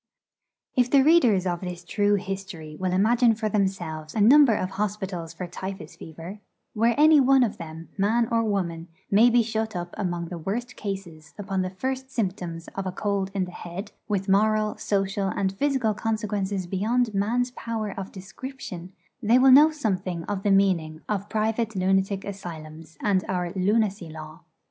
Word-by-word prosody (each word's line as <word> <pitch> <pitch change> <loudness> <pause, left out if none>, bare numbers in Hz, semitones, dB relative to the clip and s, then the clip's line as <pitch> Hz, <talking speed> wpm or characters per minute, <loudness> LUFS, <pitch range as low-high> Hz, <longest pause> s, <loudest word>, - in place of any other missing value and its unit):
If 250 -1 +3
the 275 0 +5
readers 250 - +4
of 175 -2 -1
this 180 -1 -6
true 205 +3 +2
history 190 -5 -5
will 185 +2 -2
imagine 225 +5 +4
for 215 0 -2
themselves 175 -7 -2
a - - 0
number 250 +2 +7
of 185 -1 -2
hospitals 190 -4 -3
for 180 +2 -6
typhus 190 -2 -7
fever, 165 +5 -9 0.3
where 230 +2 +2
any 310 0 +7
one 270 -1 +5
of 225 - -2
them, 165 0 -8
man 225 +4 +2
or 230 0 +2
woman, 175 -6 -2 0.2
may 220 +5 +6
be 240 0 +4
shut 220 -1 -3
up 175 0 -5
among 175 -4 -2
the 175 - -6
worst 235 +9 -4
cases 175 -7 -7
upon 195 -2 -2
the 185 - -2
first 260 +7 -4
symptoms 180 -8 -3
of 195 -1 -5
a - - -2
cold 200 0 -1
in 190 -2 +1
the 180 - -10
head 180 +4 -7 0.2
with 200 -2 -1
moral, 215 +2 +2
social, 195 0 -1
and 190 0 -1
physical 260 -1 +1
consequences 205 -3 -2
beyond 220 +6 0
man's 235 +5 0
power 230 -3 -4
of 195 -1 -6
description 190 -2 -8 0.3
they 230 +2 +4
will 260 +1 +6
know 295 +4 +8
something 190 - -2
of 195 +2 -3
the 205 - 0
meaning 180 -5 +2
of 205 -1 -2
private 220 0 -1
lunatic 190 +1 +1
asylums, 165 -5 -8
and 190 -3 +2
our 180 -1 -2
'lunacy 200 -2 0
law.' 155 +1 -9
195 Hz, 170 wpm, -25 LUFS, 180-220 Hz, 0.3 s, know